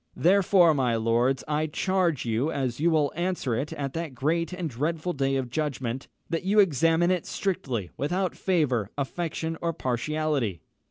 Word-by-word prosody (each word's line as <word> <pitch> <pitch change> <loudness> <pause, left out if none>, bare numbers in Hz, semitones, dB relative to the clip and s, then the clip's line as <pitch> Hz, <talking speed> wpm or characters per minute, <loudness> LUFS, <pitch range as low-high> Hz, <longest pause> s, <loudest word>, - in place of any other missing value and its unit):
Therefore, 180 -2 +5
my 125 -5 +1
lords, 120 +4 +1
I 155 +1 0
charge 175 -3 0
you, 120 +7 0
as 130 -4 -2
you 165 +3 +3
will 150 -4 +2
answer 175 -7 -1
it 140 +6 -2
at 140 -2 -4
that 165 -5 -4
great 165 +7 0
and 180 -2 -3
dreadful 155 +6 -2
day 135 -2 0
of 130 -3 -2
judgment, 135 -4 -2 0.2
that 165 0 -1
you 200 +3 +2
examine 165 -1 +4
it 180 -3 -1
strictly, 130 - -2
without 180 +6 -1
favour, 135 - +1
affection, 160 +2 -3
or 170 -1 0
partiality. 130 - -1
155 Hz, 160 wpm, -27 LUFS, 130-170 Hz, 0.2 s, Therefore